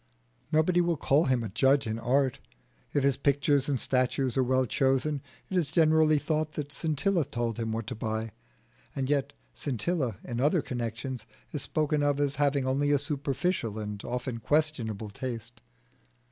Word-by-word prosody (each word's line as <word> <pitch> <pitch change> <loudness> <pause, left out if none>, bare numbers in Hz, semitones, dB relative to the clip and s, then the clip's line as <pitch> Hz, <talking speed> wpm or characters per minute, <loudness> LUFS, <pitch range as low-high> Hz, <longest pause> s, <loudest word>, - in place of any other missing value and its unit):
Nobody 165 +3 +3
will 170 -2 +1
call 145 +4 +3
him 130 -3 +1
a 110 - -4
judge 135 +7 +3
in 110 0 -2
art. 130 +2 +1 0.5
If 145 - +1
his 140 -2 +3
pictures 140 0 +2
and 135 -3 +1
statues 130 0 +1
are 135 - +3
well 130 +1 +2
chosen 135 +3 +1 0.3
it 190 - -4
is 170 -6 +2
generally 155 -1 +4
thought 155 +1 -1
that 145 -1 -5
Scintilla 165 +4 +1
told 120 -3 -3
him 115 -1 -2
what 110 0 -2
to 125 - -4
buy; 110 -1 -3 0.6
and 135 0 -1
yet 140 -2 +1 0.2
Scintilla 130 - -1
in 120 0 -3
other 150 +2 +3
connections 120 0 -4 0.2
is 150 - -3
spoken 150 0 0
of 145 -1 +2
as 140 -1 0
having 140 -2 +2
only 140 +2 +1
a 145 - +5
superficial 140 - -1
and 105 -1 -5
often 125 -1 -3
questionable 115 -7 0
taste. 115 0 -5
135 Hz, 165 wpm, -29 LUFS, 120-150 Hz, 0.6 s, a